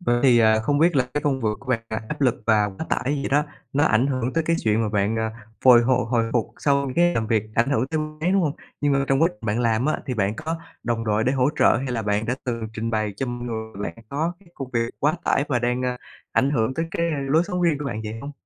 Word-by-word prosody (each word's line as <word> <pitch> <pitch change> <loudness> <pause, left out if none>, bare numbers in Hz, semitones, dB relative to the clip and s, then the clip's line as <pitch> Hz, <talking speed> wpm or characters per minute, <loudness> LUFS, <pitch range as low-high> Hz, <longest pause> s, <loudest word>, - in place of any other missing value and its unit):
Vậy 120 -8 +1
thì 120 -3 +6 0.2
không 145 +4 +1
biết 165 -1 +3
là 130 - +5
cái 145 - -1
công 135 -3 0
v 110 - -1
của 140 - -16
bạn 115 -3 +1
là 110 - -2
áp 150 - -5
lực 125 -4 +1
và 105 -2 +4
quá 100 +12 -7
tải - - 0 0.2
vậy - - -2
đó, 145 +2 +3 0.3
nó 145 +2 +3
ảnh 120 0 +3
hưởng 130 -2 -1
tới 165 -1 0
cái 165 0 +2
chuyện 110 +1 +2
mà 110 - 0
bạn, 105 +1 0
ờ, 110 0 -1 0.3
hồi 125 -2 +8
h 120 - 0 0.2
hồi 115 -2 +1
phục 120 -3 +1
sau 140 -2 +1
cái 175 0 +4
làm 115 - 0
việc 110 -2 +2
ảnh 120 +4 +2
hưởng 130 -2 +1
tới 160 +2 -2
mấy, 155 +3 -2
đúng 195 -2 +3
không? 150 -3 +1 0.3
Nhưng 145 -1 +2
mà 140 0 +2
trong 135 +3 +3
quá - - +5
trình 105 +1 -11
bạn 105 +4 0
làm 115 +2 +1
á, 155 - 0
thì 125 - -2
bạn 100 -1 0
có 160 +2 -3 0.3
đồng 115 -1 -1
đội 110 +1 +1
để 130 - +2
hỗ 130 0 +2
trợ - - +5
hay 135 +3 -3
là 115 -2 -2
bạn 105 +1 0
đã 125 - 0
từng 115 -3 -3
trình 115 +1 -3
bày 110 -2 -1
cho 135 - -2
mọi 120 0 -5
người 110 -3 -5
bạn 115 +2 -6
có 155 +6 -1
cái 185 - -21
công 135 -2 -6
việc 115 0 0
quá 150 +2 +2
tải 140 - +2
và 125 - +1
đang, 125 +1 -1
ờ, 125 -1 -1 0.4
ảnh 135 - +2
hưởng 125 -2 0
tới 165 0 -1
cái 170 0 0 0.2
lối 160 +4 +4
sống 180 -2 -2
riêng 160 -4 +2
của 150 - -5
bạn 110 -5 -3
vậy 110 +1 -5
hông? 140 +3 -7
125 Hz, 285 wpm, -23 LUFS, 115-145 Hz, 0.4 s, hồi